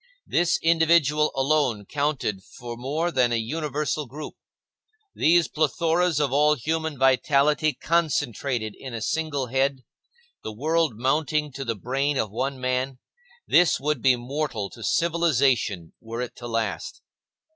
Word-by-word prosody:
This 175 Hz, 0 st, +2 dB
individual 160 Hz, -2 st, +3 dB
alone 135 Hz, -6 st, +1 dB
counted 140 Hz, -9 st, -2 dB
for 120 Hz, +2 st, -9 dB
more 150 Hz, +8 st, -2 dB
than 125 Hz, -5 st, +2 dB
a -, -, +1 dB
universal 150 Hz, +4 st, -2 dB
group. 150 Hz, +5 st, -8 dB, 0.8 s
These 170 Hz, +1 st, +3 dB
plethoras 165 Hz, +2 st, +1 dB
of 140 Hz, -3 st, 0 dB
all 150 Hz, +2 st, +4 dB
human 160 Hz, +2 st, -2 dB
vitality 140 Hz, +3 st, +3 dB
concentrated 140 Hz, -8 st, -1 dB
in 130 Hz, -3 st, -8 dB
a 115 Hz, -, -5 dB
single 150 Hz, -1 st, -1 dB
head; 135 Hz, +1 st, 0 dB, 0.6 s
the 110 Hz, -, -5 dB
world 160 Hz, +4 st, +1 dB
mounting 150 Hz, +4 st, 0 dB
to 135 Hz, +1 st, -6 dB
the 115 Hz, -3 st, -2 dB
brain 135 Hz, +7 st, -1 dB
of 110 Hz, -, -1 dB
one 130 Hz, +4 st, -3 dB
man,—this 135 Hz, -, 0 dB
would 150 Hz, -2 st, -1 dB
be 130 Hz, -2 st, +5 dB
mortal 120 Hz, -5 st, -3 dB
to 115 Hz, -, -11 dB
civilization 135 Hz, -, +1 dB
were 115 Hz, +1 st, -5 dB
it 125 Hz, -, -5 dB
to 120 Hz, -, -7 dB
last. 115 Hz, -, -3 dB
140 Hz, 135 wpm, -25 LUFS, 125-155 Hz, 0.8 s, be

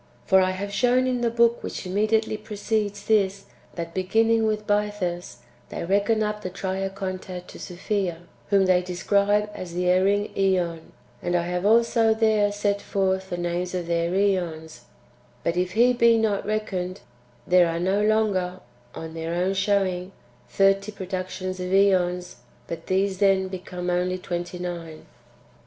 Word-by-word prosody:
For 190 Hz, 0 st, +5 dB
I 185 Hz, -, +2 dB
have 200 Hz, +2 st, -4 dB
shown 245 Hz, +5 st, +3 dB
in 250 Hz, -1 st, 0 dB
the 235 Hz, -, +2 dB
book 235 Hz, 0 st, +3 dB
which -, -, -6 dB
immediately 215 Hz, +4 st, +1 dB
precedes 210 Hz, -1 st, -3 dB
this, 200 Hz, -2 st, +1 dB, 0.3 s
that, 170 Hz, -1 st, -5 dB
beginning 225 Hz, +4 st, +2 dB
with 215 Hz, -1 st, -1 dB
Bythus, 205 Hz, -4 st, -2 dB, 0.3 s
they -, -, -5 dB
reckon 205 Hz, +4 st, +2 dB
up 210 Hz, 0 st, -2 dB
the 185 Hz, -, -4 dB
Triacontad 190 Hz, -1 st, -4 dB
to -, -, -11 dB
Sophia, 180 Hz, -1 st, -3 dB, 0.3 s
whom 200 Hz, -1 st, +4 dB
they 185 Hz, -1 st, +4 dB
describe 200 Hz, +3 st, +1 dB
as 175 Hz, -4 st, -7 dB
the 180 Hz, 0 st, -1 dB
erring 195 Hz, +3 st, +2 dB
iEon; 180 Hz, -4 st, +1 dB, 0.4 s
and 175 Hz, -, -1 dB
I 175 Hz, -, +2 dB
have 180 Hz, +2 st, -1 dB
also 230 Hz, 0 st, +4 dB
there 215 Hz, -2 st, +3 dB
set 205 Hz, 0 st, -1 dB
forth 190 Hz, -1 st, -1 dB
the 175 Hz, -, -3 dB
names 175 Hz, +1 st, -2 dB
of 180 Hz, -2 st, -2 dB
their 170 Hz, 0 st, 0 dB
[^ons]; 170 Hz, -8 st, -1 dB, 0.6 s
but 170 Hz, -, 0 dB
if 180 Hz, +1 st, -1 dB
He 245 Hz, +3 st, +4 dB
be 235 Hz, -1 st, +4 dB
not 210 Hz, -3 st, 0 dB
reckoned, 195 Hz, -3 st, -3 dB, 0.4 s
there 180 Hz, -1 st, +5 dB
are 165 Hz, 0 st, -2 dB
no 190 Hz, +4 st, +1 dB
longer, 200 Hz, -4 st, +1 dB, 0.4 s
on 160 Hz, 0 st, -7 dB
their 165 Hz, +1 st, -4 dB
own 180 Hz, +2 st, +1 dB
showing, 195 Hz, -2 st, 0 dB, 0.4 s
thirty 195 Hz, +1 st, +2 dB
productions 185 Hz, -1 st, -5 dB
of 180 Hz, 0 st, -3 dB
^ons, 185 Hz, -3 st, +2 dB, 0.3 s
but 165 Hz, +2 st, -7 dB
these 190 Hz, 0 st, 0 dB
then 195 Hz, -1 st, +3 dB
become 180 Hz, -1 st, -5 dB
only 180 Hz, +1 st, 0 dB
twenty 175 Hz, 0 st, -5 dB
nine. 170 Hz, -3 st, -6 dB
190 Hz, 155 wpm, -25 LUFS, 180-210 Hz, 0.6 s, For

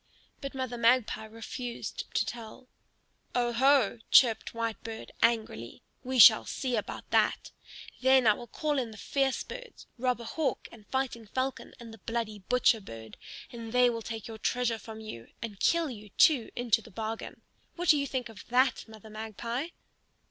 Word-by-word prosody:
But 275 Hz, -1 st, -6 dB
Mother 255 Hz, -2 st, -3 dB
Magpie 230 Hz, -2 st, +3 dB
refused 230 Hz, +2 st, -6 dB
to -, -, +2 dB
tell. 235 Hz, +1 st, -8 dB, 0.7 s
"Oho!" 245 Hz, -1 st, +3 dB
chirped 235 Hz, -4 st, +5 dB
Whitebird, 230 Hz, -1 st, -4 dB
angrily; 220 Hz, -, 0 dB, 0.2 s
"we 260 Hz, +1 st, -2 dB
shall 220 Hz, -1 st, +9 dB
see 255 Hz, -3 st, -2 dB
about 210 Hz, -, -5 dB
that! -, -, +2 dB, 0.5 s
Then 260 Hz, -1 st, +5 dB
I 215 Hz, -, +7 dB
will 240 Hz, -, -9 dB
call 295 Hz, +4 st, -1 dB
in 245 Hz, -3 st, -2 dB
the 215 Hz, -, -11 dB
fierce 270 Hz, +4 st, 0 dB
birds, -, -, -10 dB
Robber 250 Hz, -1 st, 0 dB
Hawk 270 Hz, +3 st, -2 dB
and 215 Hz, -3 st, -15 dB
Fighting 260 Hz, -4 st, -2 dB
Falcon 260 Hz, +5 st, -3 dB
and 230 Hz, -2 st, -10 dB
the 225 Hz, -, -12 dB
bloody 225 Hz, 0 st, -3 dB
Butcher 240 Hz, +2 st, +2 dB
Bird, 110 Hz, -, -10 dB, 0.4 s
and 230 Hz, -1 st, -8 dB
they 250 Hz, -1 st, +5 dB
will 230 Hz, -1 st, -4 dB
take 225 Hz, -1 st, -6 dB
your 220 Hz, -1 st, -8 dB
treasure 240 Hz, -1 st, 0 dB
from 220 Hz, +1 st, -9 dB
you, 115 Hz, -, -8 dB
and 210 Hz, -4 st, -7 dB
kill 335 Hz, -4 st, +2 dB
you, 210 Hz, -3 st, -10 dB
too, 260 Hz, +2 st, +4 dB
into 235 Hz, -2 st, +2 dB
the 225 Hz, -, -14 dB
bargain. 220 Hz, +2 st, -6 dB, 0.3 s
What 350 Hz, -1 st, -2 dB
do 300 Hz, -, +7 dB
you 280 Hz, -, -1 dB
think 255 Hz, -2 st, -3 dB
of 225 Hz, -2 st, -13 dB
that, 255 Hz, +2 st, +2 dB
Mother 220 Hz, -1 st, -13 dB
Magpie?" 225 Hz, +6 st, -4 dB
235 Hz, 165 wpm, -29 LUFS, 220-255 Hz, 0.7 s, shall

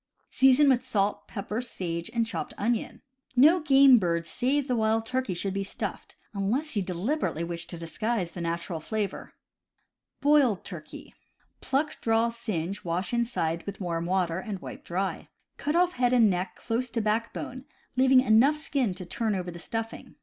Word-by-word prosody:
Season 265 Hz, +2 st, +5 dB
with 255 Hz, -2 st, +4 dB
salt, 205 Hz, -5 st, -1 dB
pepper, 210 Hz, +2 st, -4 dB
sage, 170 Hz, -8 st, -4 dB
and 230 Hz, -1 st, +1 dB
chopped 225 Hz, -, -5 dB
onion. 230 Hz, +2 st, -2 dB, 0.3 s
No 305 Hz, +8 st, +6 dB
game 275 Hz, -4 st, +7 dB
bird 170 Hz, -3 st, 0 dB
save 270 Hz, +8 st, 0 dB
the 250 Hz, -, +1 dB
wild 220 Hz, 0 st, +1 dB
turkey 255 Hz, -5 st, -2 dB
should 190 Hz, +2 st, -2 dB
be 195 Hz, 0 st, -1 dB
stuffed, 195 Hz, -, -5 dB, 0.2 s
unless 235 Hz, +9 st, -1 dB
you 205 Hz, -, +2 dB
deliberately 185 Hz, -, -2 dB
wish 170 Hz, 0 st, -4 dB
to 170 Hz, -, -7 dB
disguise 185 Hz, +3 st, -2 dB
the 175 Hz, -, -7 dB
natural 170 Hz, 0 st, -3 dB
flavor. 210 Hz, +3 st, -4 dB, 0.8 s
Boiled 280 Hz, -9 st, +3 dB
Turkey. 170 Hz, -5 st, -9 dB, 0.2 s
— -, -, -41 dB
Pluck, 300 Hz, +3 st, -1 dB
draw, 225 Hz, +1 st, +2 dB
singe, 200 Hz, -6 st, -4 dB
wash 180 Hz, +4 st, -2 dB
inside 200 Hz, -9 st, -1 dB
with 200 Hz, -, -5 dB
warm 170 Hz, -3 st, -2 dB
water, 180 Hz, -2 st, 0 dB
and 200 Hz, +1 st, -5 dB
wipe -, -, -9 dB
dry. 190 Hz, +3 st, -3 dB, 0.3 s
Cut 295 Hz, +2 st, -1 dB
off 355 Hz, +1 st, +3 dB
head 250 Hz, 0 st, +1 dB
and 230 Hz, -5 st, +5 dB
neck 180 Hz, +1 st, -2 dB
close 240 Hz, +2 st, -2 dB
to 230 Hz, -, -2 dB
backbone, 230 Hz, +4 st, -2 dB, 0.3 s
leaving 260 Hz, 0 st, +6 dB
enough 255 Hz, +5 st, +4 dB
skin 275 Hz, -9 st, -1 dB
to 185 Hz, 0 st, -7 dB
turn 220 Hz, +2 st, -1 dB
over 180 Hz, -1 st, -3 dB
the 170 Hz, -, -9 dB
stuffing. 225 Hz, +5 st, -5 dB
220 Hz, 170 wpm, -27 LUFS, 180-255 Hz, 0.8 s, game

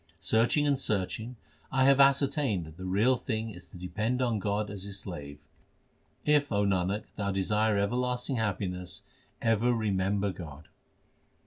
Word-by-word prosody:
Searching 115 Hz, -, +2 dB
and 140 Hz, -2 st, +2 dB
searching 110 Hz, +2 st, -2 dB, 0.4 s
I 130 Hz, 0 st, +3 dB
have 135 Hz, 0 st, +5 dB
ascertained 135 Hz, -, +3 dB
that 80 Hz, 0 st, -12 dB
the 95 Hz, -, -7 dB
real 105 Hz, +8 st, +3 dB
thing 110 Hz, -1 st, -3 dB
is 90 Hz, -2 st, -12 dB
to -, -, -13 dB
depend 110 Hz, +7 st, -2 dB
on 120 Hz, -4 st, +1 dB
God 105 Hz, +1 st, -1 dB
as 100 Hz, -2 st, -6 dB
His 100 Hz, 0 st, -5 dB
slave. 75 Hz, -7 st, -7 dB, 0.9 s
If, 145 Hz, -2 st, +3 dB
O 100 Hz, -1 st, +2 dB
Nanak, 95 Hz, +1 st, 0 dB
thou 100 Hz, -1 st, -1 dB
desire 105 Hz, +2 st, +1 dB
everlasting 125 Hz, +5 st, 0 dB
happiness, 90 Hz, -4 st, -2 dB, 0.4 s
ever 115 Hz, +1 st, +3 dB
remember 100 Hz, -2 st, 0 dB
God. 80 Hz, -4 st, -10 dB
105 Hz, 145 wpm, -29 LUFS, 95-125 Hz, 0.9 s, have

